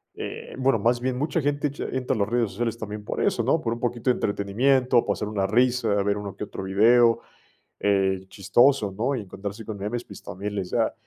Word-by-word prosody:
eh, - - -7
bueno, 130 -3 +2
más 120 +4 +2
bien 130 +1 -1
mucha 150 +5 -1
gente 145 +1 0
echa 145 0 -6
entra 130 0 -1
a - - -3
las 100 - +1
redes 120 -2 +1
sociales 115 +3 -2
también 105 -2 -7
por - - -3
eso, 120 - +1
¿no? 145 +7 +2
Por 115 -4 -1
un 115 - -6
poquito 120 +1 -1
de 125 - +4
entretenimiento, 120 +5 +2
pasar 105 - -1
una 105 -2 -1
risa, 120 +2 +2
ver 100 0 0
uno 100 -2 -6
que 105 - -5
otro 95 - -7
video, 115 +5 +4 0.6
eh, 95 -2 +1
chistoso, 115 +2 +3
¿no? 125 +7 0
Y 120 - -3
encontrarse 100 +2 -7
con 110 - -5
memes, 110 +5 -3
pues 100 - -11
también 100 +2 -6
les 95 -3 -3
da - - +1
115 Hz, 215 wpm, -25 LUFS, 100-125 Hz, 0.6 s, de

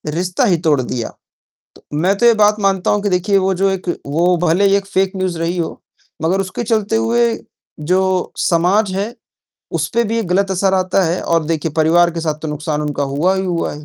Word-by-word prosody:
रिश्ता 180 +7 0
ही 180 -7 +3
तोड़ 145 -3 +3
दिया। 120 -2 -4 0.7
तो - - -18 0.2
मैं 185 +5 +2
तो 240 - +3
ये 235 - +6
बात 210 -1 +3
मानता 195 -2 +1
हूँ 205 0 +1
कि 205 - 0
देखिए 185 +3 +1
वो 190 0 +1
जो 195 +2 +1
एक 190 -1 -4 0.2
वो 170 +5 +2
भले 175 +5 +2
ही 195 0 +4
एक 200 -1 -3
फेक 190 -1 0
न्यूज़ 185 -3 -2
रही 165 +2 -2
हो, 165 - -4 0.4
मगर 180 +4 +1
उसके 190 +4 -4
चलते 220 -1 0
हुए 235 +1 +2 0.6
जो 185 +3 0
समाज 185 +4 +2
है, 205 +5 -3 0.6
उसपे 170 +9 0
भी 225 +1 -1
एक 225 - -2
गलत 195 +2 +1
असर 190 +1 +1
आता 185 0 +1
है 170 +2 -1
और 165 -1 +1
देखिए 160 0 -2
परिवार 170 +2 +4
के 170 - -5
साथ 155 -2 -2
तो 155 - -3
नुकसान 150 0 -3
उनका 145 -1 -2
हुआ 145 +7 0
ही 190 - -1
हुआ 175 -2 -2
है। 150 +1 -11
185 Hz, 215 wpm, -17 LUFS, 165-195 Hz, 0.7 s, ये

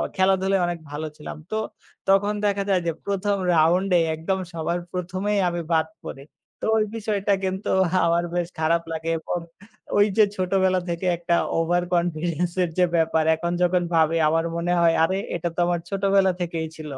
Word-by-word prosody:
খেলাধুলায় 190 0 +2
অনেক 175 -1 -3
ভালো 155 +2 -4
ছিলাম। 150 - -8
তো 215 - -1 0.5
তখন 205 +2 +3
দেখা 200 -1 +1
যায় 185 -2 +3
যে - - +2
১ম 200 0 0 0.2
round-এ 175 +3 +3 0.2
একদম 190 +5 -2
সবার 170 +2 -2
প্রথমেই 185 +3 -1
আমি 175 0 -3
বাদ 160 -1 +2 0.2
পড়ি। 135 - -7 0.4
তো - - -4
ওই 215 - +3
বিষয়টা 205 -2 -1
কিন্তু 190 +1 -2 0.4
আমার 170 +1 +2
বেশ 175 -1 0
খারাপ 165 +1 +2
লাগে 160 0 -3
এবং 175 - -3 0.6
ওই 205 - +6
যে 215 - +7
ছোটবেলা 185 0 +1
থেকে 170 +2 -3
একটা 170 0 0 0.2
over 175 +2 +1
confidence-এর 175 +1 0
যে 180 - +5
ব্যাপার 160 -1 +2
এখন 170 +2 -3
যখন 180 0 +2
ভাবি 165 0 +3
আমার 165 +2 +1
মনে 170 +1 -1
হয় 165 -1 +4
আরে 190 +3 +1 0.2
এটা 170 0 -2
তো - - -4
আমার 175 -1 0
ছোটবেলা 195 -1 +2
থেকেই 165 -2 -2
ছিল। 155 -2 -8
175 Hz, 170 wpm, -24 LUFS, 165-190 Hz, 0.6 s, যে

